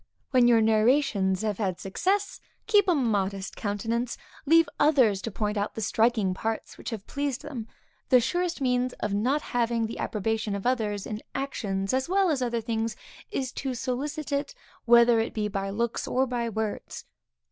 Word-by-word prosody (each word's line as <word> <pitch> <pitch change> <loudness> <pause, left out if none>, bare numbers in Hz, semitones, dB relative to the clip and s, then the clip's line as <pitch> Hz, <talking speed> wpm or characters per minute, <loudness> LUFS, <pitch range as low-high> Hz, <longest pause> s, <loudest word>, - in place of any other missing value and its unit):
When 250 -2 +5
your 230 -2 +5
narrations 220 -3 +2
have 210 -2 -1
had 190 -4 -1
success, 385 - -1 0.3
keep 415 -3 +4
a 355 - +4
modest 200 -7 -1
countenance; 225 +3 -2 0.3
leave 330 +2 +6
others 255 -10 +4
to 230 - -3
point 210 +1 -2
out 205 +1 -2
the 220 - -4
striking 220 -2 +2
parts 225 +3 -4
which - - -7
have 220 -4 -6
pleased 280 -2 -3
them. 250 -7 -6 0.4
The 255 - +7
surest 350 +5 -1
means 250 -1 +1
of 210 - -3
not 255 +9 +1
having 235 -1 0
the 225 - -6
approbation 215 0 -1
of 200 - -5
others, 215 -5 0
in 215 0 -5
actions 200 -8 -2
as 260 +4 0
well 380 -2 +3
as 275 -4 0
other 235 -2 0
things, 225 0 -2 0.3
is 265 -11 -3
to 265 -2 -4
solicit 285 +4 -3
it, 280 0 -2 0.3
whether 235 0 +6
it 225 - -2
be 210 -1 0
by 195 -1 -3
looks, 235 +3 -2
or 260 +1 +2
by 240 -2 -2
words. 220 -1 -4
235 Hz, 175 wpm, -27 LUFS, 210-265 Hz, 0.4 s, The